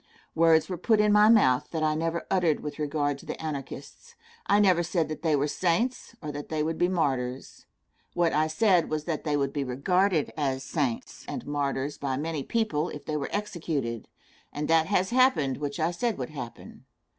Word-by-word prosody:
Words 160 -1 +4
were 180 -3 -5
put 220 +3 +3
in 210 0 +4
my 210 +1 +6
mouth 130 - +4
that 160 -2 -2
I 155 0 +2
never 165 +2 -2
uttered 175 -5 +2
with 150 0 -6
regard 145 -1 -1
to - - -14
the - - -5
Anarchists. 150 - -7 0.3
I 205 - +4
never 185 -4 +4
said 170 -2 -1
that 155 - -5
they 160 -2 +2
were 145 0 +1
saints, 225 - -1
or 150 - -4
that 145 0 -7
they 155 -1 -1
would 160 +1 -2
be 175 - +4
martyrs. 135 -8 -2 0.5
What 170 -1 +2
I 155 +1 +2
said 180 +1 +2
was 155 -1 -2
that 155 -2 -3
they 150 -1 +1
would 140 -1 -1
be 145 - -1
regarded 160 +6 +1
as 135 -3 -1
saints 135 -6 -3
and - - -5
martyrs 145 -1 -2
by 135 -2 -2
many 155 0 -3
people 175 -4 -1
if 145 - -9
they 155 - -3
were 145 -2 -2
executed, 160 - -3 0.4
and 150 +1 -3
that 160 0 +3
has 190 +1 +1
happened 240 - +3
which 145 0 -4
I 160 +2 +1
said 225 +5 -1
would 125 0 -5
happen. 130 -6 -9
155 Hz, 200 wpm, -27 LUFS, 145-180 Hz, 0.5 s, my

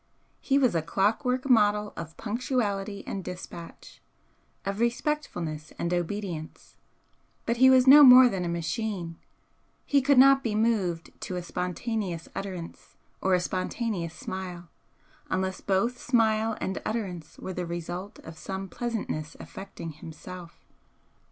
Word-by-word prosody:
He 275 - +1
was 255 -4 +3
a 165 - +1
clock 195 +7 +1
work 255 +1 0
model 210 -4 +3
of 165 -1 -8
punctuality 210 -4 -2
and 195 - -4
dispatch, 180 -2 -9 0.6
of 195 +1 -2
respectfulness 235 - -2
and 170 +1 -1
obedience, 175 -2 -4 0.7
but 235 +1 0
he 260 +2 +7
was 260 -1 +6
no 290 +2 +10
more 255 -1 +10
than 195 -6 -2
a - - -2
machine, 170 0 -3 0.7
he 280 -1 +3
could 280 +1 +3
not 270 +1 +7
be 220 -3 -1
moved 205 -7 0
to 185 - -4
a 180 - -3
spontaneous 180 0 -3
utterance 185 -4 -7 0.3
or 190 -1 +3
a - - +2
spontaneous 185 -1 -3
smile, 180 -2 -6 0.6
unless 190 0 -1
both 230 +6 0
smile 225 -2 +2
and 190 - -3
utterance 185 -8 -4
were 190 - -6
the 180 -1 -4
result 175 +4 -5
of 160 0 -10
some 190 0 -5
pleasantness 205 -11 -4
affecting 190 -4 -8
himself. 170 +3 -11
195 Hz, 135 wpm, -27 LUFS, 175-230 Hz, 0.7 s, no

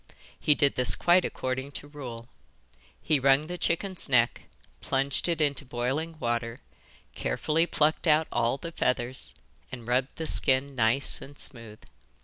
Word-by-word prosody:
He 150 - +3
did 140 -2 +2
this 125 -1 +5
quite 175 +1 +3
according 130 +2 -4
to 145 - -8
rule. 125 -6 -9 0.8
He 150 -2 +2
wrung 135 +3 +3
the 175 +2 -7
chicken's 180 +1 -2
neck, 120 -3 +2 0.4
plunged 135 +3 -1
it 165 -2 -1
into 145 -2 +1
boiling 135 +6 -3
water, 120 -2 -2 0.5
carefully 155 - -1
plucked 155 +2 0
out 155 +1 +3
all 120 +2 0
the 170 +3 -8
feathers, 125 -4 -2 0.4
and 120 -3 -9
rubbed 130 +2 0
the 160 - -5
skin 135 -1 +4
nice 120 +3 +1
and 140 +1 -12
smooth. 115 -4 -4
135 Hz, 145 wpm, -27 LUFS, 120-155 Hz, 0.8 s, this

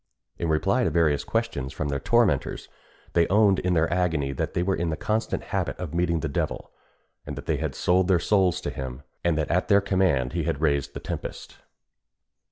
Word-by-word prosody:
In 85 - -1
reply 95 +11 +2
to 95 - +2
various 80 -3 +2
questions 115 - -2
from 75 +1 -3
their 70 -1 -1
tormentors, 110 - +1 0.5
they 85 -1 +3
owned 100 -1 +4
in 90 -1 0
their 80 0 +3
agony 80 -6 0
that 70 - -3
they 85 - +1
were 95 +1 +1
in 85 -1 -1
the 80 - -2
constant 110 +1 -1
habit - - -1
of 90 -4 -6
meeting 85 -1 +1
the 80 - -1
devil; 70 - -3 0.5
that - - -7
they - - 0
had - - -3
sold 90 +1 +2
their 95 -2 +4
souls 90 0 +2
to 70 - -3
him; 65 0 -6 0.2
and 85 -2 +2
that 80 - -1
at 90 +2 +1
their 100 - +6
command 95 -10 +1
he 85 - 0
had 80 -2 -2
raised 70 -3 0
the - - -4
tempest. - - -6
85 Hz, 200 wpm, -25 LUFS, 75-95 Hz, 0.5 s, their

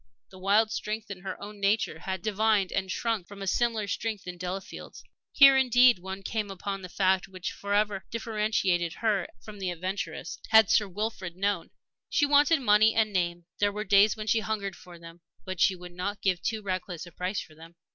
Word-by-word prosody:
The 185 - -13
wild 210 +3 +3
strength 215 -1 -4
in 190 - -6
her 190 0 -6
own 205 0 -9
nature 200 -5 +1
had 190 0 -5
divined 215 -2 +1
and 190 -1 -2
shrunk 225 -5 -2
from 200 0 -11
a - - -4
similar 225 +1 0
strength 215 +1 -3
in 180 -1 -6
Delafield's. 185 +2 -7 0.3
Here, 275 -1 +8
indeed, 250 -4 +5
one 190 +2 -7
came 215 0 -3
upon 195 +1 -5
the 185 - -8
fact 190 0 +1
which 185 -2 -5
forever 205 -1 -1
differentiated 210 -6 0
her 210 -5 0 0.2
from 210 -1 -10
the 190 -2 -2
adventuress, 185 +3 -5
had 220 -3 +6
Sir 210 - +3
Wilfrid 190 -2 -4
known. 200 +2 -1 0.4
She 290 - +3
wanted 290 +2 +4
money 215 -1 +4
and 215 -2 +2
name; 175 -2 -1
there 205 -1 +2
were 210 +1 -4
days 205 +2 +4
when 215 - -5
she 220 +1 +2
hungered 205 -3 -3
for 175 -1 -13
them. 165 0 -13 0.2
But 185 -2 -5
she 190 - +4
would 180 0 -11
not 200 +3 -4
give 185 -3 +1
too 220 -1 -2
reckless 185 -3 -4
a 175 - -12
price 185 +4 -3
for 155 - -10
them. 165 +2 -15
200 Hz, 195 wpm, -28 LUFS, 185-215 Hz, 0.4 s, Here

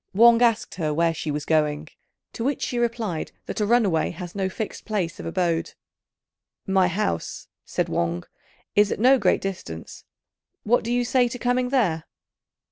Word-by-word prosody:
Wang 235 +2 +7
asked 230 -3 +2
her 155 -2 0
where 165 +2 +2
she 160 -1 -5
was 150 0 -2
going; 150 -1 +1 0.5
to 230 - -4
which 275 +3 -1
she 245 - -1
replied 230 -8 -2
that - - -5
a 210 - +1
runaway 205 -9 +3
had 175 0 -7
no 195 -2 -1
fixed 210 +3 -5
place 190 -7 -2
of - - -5
abode. 170 -1 -1 0.9
"My 190 -2 +3
house," 180 - -2 0.2
said - - -1
Wang, 85 +1 -1 0.5
"is 205 0 +4
at - - -2
no 260 +3 +6
great 195 -4 +2
distance; 85 - -6 0.6
what 240 +3 +2
do 230 - -3
you 245 0 +1
say 250 0 +3
to 240 - -5
coming 250 +1 0
there?" 190 - +1
195 Hz, 170 wpm, -24 LUFS, 165-235 Hz, 0.9 s, Wang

